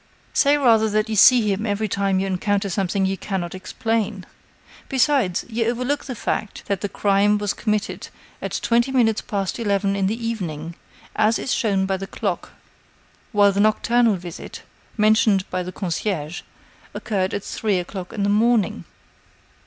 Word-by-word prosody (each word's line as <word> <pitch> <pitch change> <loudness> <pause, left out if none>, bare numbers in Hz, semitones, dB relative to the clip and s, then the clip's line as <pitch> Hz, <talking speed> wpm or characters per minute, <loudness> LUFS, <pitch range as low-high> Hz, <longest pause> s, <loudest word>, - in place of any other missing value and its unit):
"Say 285 +1 +4
rather 225 -5 +4
that 215 +1 0
you 220 - -1
see 245 +4 +7
him 195 +2 -2
every 210 +1 -1
time 195 -1 0
you 195 - 0
encounter 195 +1 -1
something 195 +1 0
you 190 0 -1
cannot 185 -4 -3
explain. 210 +1 -2 0.6
Besides, 260 - +2
you 230 0 -1
overlook 250 +5 -1
the 255 - -5
fact 215 -1 -3
that 200 -2 -2
the 205 - -2
crime 205 +1 +2
was 205 -1 -1
committed 215 -1 -2 0.3
at - - -3
twenty 240 +3 +2
minutes 230 -5 +2
past 200 +1 -3
eleven 200 -2 0
in 195 -1 +1
the 220 +3 -1
evening, 170 -8 -4 0.4
as 215 +1 +3
is 260 - -2
shown 200 -5 +1
by 190 0 -1
the 195 +1 -6
clock, 195 -3 -3 0.8
while 205 -2 +5
the 200 - -2
nocturnal 225 +1 +3
visit, 175 -2 -9 0.3
mentioned 215 -2 +3
by 185 - -1
the 180 +1 -5
concierge, 175 -3 -3 0.5
occurred 195 -4 -1
at 200 - -4
three 210 -4 -1
o'clock 180 +1 -5
in 210 -3 -3
the - - +2
morning." 210 - +2
205 Hz, 160 wpm, -22 LUFS, 190-225 Hz, 0.8 s, see